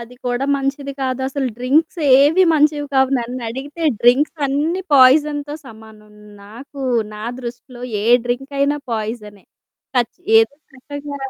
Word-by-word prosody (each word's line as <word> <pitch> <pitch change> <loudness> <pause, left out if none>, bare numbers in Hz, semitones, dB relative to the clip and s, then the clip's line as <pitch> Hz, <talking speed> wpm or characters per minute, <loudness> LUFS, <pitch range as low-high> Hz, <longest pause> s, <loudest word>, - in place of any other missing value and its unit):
అది 235 +1 -11
కూడా 245 +2 -1
మంచిది 275 0 -3
కాదసలు. 265 +1 -2
డ్రింక్సేవి 290 +4 +3
మంచివి 295 -1 +2
కావు 265 0 +3
నన్నడిగితే 255 +6 -6 0.2
డ్రింక్స్ 265 +7 +3
అన్ని 305 +7 -1
పాయిజన్‌తో 290 +2 +4
సమానం. 220 -2 -15 0.3
నాకు 270 +7 -12 0.3
నా 210 +1 -7 0.2
దృష్టిలో 245 0 -9 0.2
ఏ - - -3 0.2
డ్రింకయినా 280 +4 -1
పాయిజనె. 215 -2 -5 0.5
కచ్ 240 -2 0 0.2
ఏదో 450 -10 +2 0.2
రకంగా 285 +2 -8
270 Hz, 110 wpm, -19 LUFS, 245-290 Hz, 0.5 s, పాయిజన్‌తో